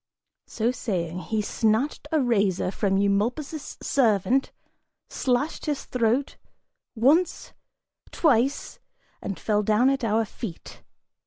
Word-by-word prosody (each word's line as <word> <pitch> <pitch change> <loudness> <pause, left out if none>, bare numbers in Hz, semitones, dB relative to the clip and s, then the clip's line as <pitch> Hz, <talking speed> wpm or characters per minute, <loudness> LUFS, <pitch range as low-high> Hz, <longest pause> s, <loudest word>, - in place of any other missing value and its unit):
So 230 +2 0
saying, 180 -9 -3
he 215 +3 -2
snatched 225 +9 0
a 315 - +3
razor 200 -7 +1
from 195 -1 0
Eumolpus' 235 +10 -1
servant, 245 +1 +2 0.6
slashed 260 +6 -1
his 295 -2 -2
throat, 250 +3 0 0.6
once, 290 +10 +2 0.6
twice, 275 -3 +1 0.4
and 195 - -5
fell 210 -1 +1
down 220 +5 +3
at 275 -1 -2
our 225 0 +1
feet! 200 -3 -8
230 Hz, 105 wpm, -25 LUFS, 205-270 Hz, 0.6 s, a